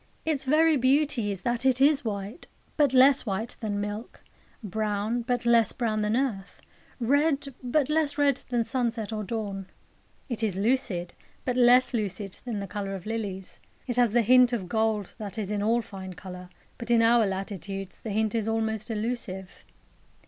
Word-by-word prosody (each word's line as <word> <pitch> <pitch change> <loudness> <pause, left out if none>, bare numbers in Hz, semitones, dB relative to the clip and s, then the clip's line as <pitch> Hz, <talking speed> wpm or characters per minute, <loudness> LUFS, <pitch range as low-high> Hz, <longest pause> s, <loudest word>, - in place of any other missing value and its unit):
Its 300 -4 -1
very 310 +3 +4
beauty 265 -3 +2
is 195 -2 -5
that 240 0 -1
it 260 -1 +3
is 285 +1 +4
white, 205 - -5 0.3
but 290 -4 +3
less 265 +1 +6
white 210 +3 -3
than 205 -2 -2
milk; 205 +3 -5 0.4
brown, 215 +3 -1
but 245 0 -2
less 235 -3 +4
brown 220 -3 -1
than 210 +2 +1
earth; 220 -8 -3 0.4
red, 280 +3 +1
but 260 +2 +1
less 305 -1 0
red 285 -2 +3
than 240 -2 +1
sunset 230 -4 -2
or 215 -1 -3
dawn. 200 -2 -4 0.6
It 240 -4 -4
is 215 -5 0
lucid, 205 -5 0 0.3
but 250 - 0
less 250 +1 +5
lucid 200 -3 -3
than 230 -4 -3
the 200 - -4
colour 195 0 -4
of 185 - -8
lilies. 205 -4 -5 0.3
It 245 -2 -3
has 240 -3 +4
the 235 +1 +3
hint 250 +2 +5
of 200 -6 -2
gold 220 -1 0
that 210 0 -6
is 210 -2 -3
in 205 -1 -1
all 230 +3 +2
fine 190 -3 -9
colour; 180 0 -9 0.3
but 235 - -6
in 235 -1 +5
our 230 -1 +5
latitudes 195 0 -5
the 225 - -6
hint 215 +1 0
is 225 -2 -1
almost 220 0 -1
elusive. 210 -4 -4
225 Hz, 175 wpm, -27 LUFS, 205-250 Hz, 0.6 s, less